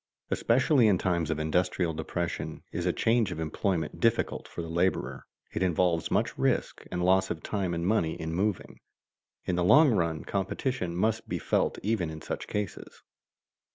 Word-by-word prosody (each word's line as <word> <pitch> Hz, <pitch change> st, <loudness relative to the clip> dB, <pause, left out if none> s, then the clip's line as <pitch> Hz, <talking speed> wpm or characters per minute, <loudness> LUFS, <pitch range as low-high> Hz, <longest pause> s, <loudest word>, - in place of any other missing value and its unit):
Especially 130 Hz, +1 st, +3 dB
in 100 Hz, -3 st, +4 dB
times 85 Hz, -3 st, 0 dB
of 80 Hz, -, 0 dB
industrial 85 Hz, +2 st, 0 dB
depression 85 Hz, +2 st, -4 dB
is -, -, -2 dB
a -, -, +4 dB
change 115 Hz, -4 st, +2 dB
of 85 Hz, -, -5 dB
employment 80 Hz, +1 st, -2 dB
difficult 115 Hz, 0 st, +1 dB
for 85 Hz, -, -6 dB
the -, -, -6 dB
laborer; 85 Hz, +3 st, -1 dB, 0.3 s
it -, -, -2 dB
involves 90 Hz, -2 st, +1 dB
much -, -, 0 dB
risk, -, -, 0 dB
and 90 Hz, 0 st, -1 dB
loss 95 Hz, +1 st, +3 dB
of 80 Hz, -3 st, -4 dB
time 95 Hz, -5 st, -1 dB
and 85 Hz, 0 st, -2 dB
money 90 Hz, -5 st, +1 dB
in 80 Hz, 0 st, -4 dB
moving. 100 Hz, +3 st, -2 dB, 0.7 s
In 90 Hz, -, 0 dB
the 90 Hz, -, +2 dB
long 145 Hz, -, +7 dB
run 85 Hz, -6 st, 0 dB
competition 95 Hz, -1 st, -2 dB
must 110 Hz, +5 st, 0 dB
be -, -, -1 dB
felt -, -, 0 dB
even 100 Hz, -5 st, 0 dB
in 80 Hz, 0 st, -7 dB
such -, -, -5 dB
cases. 105 Hz, -3 st, -5 dB
90 Hz, 170 wpm, -28 LUFS, 85-105 Hz, 0.7 s, long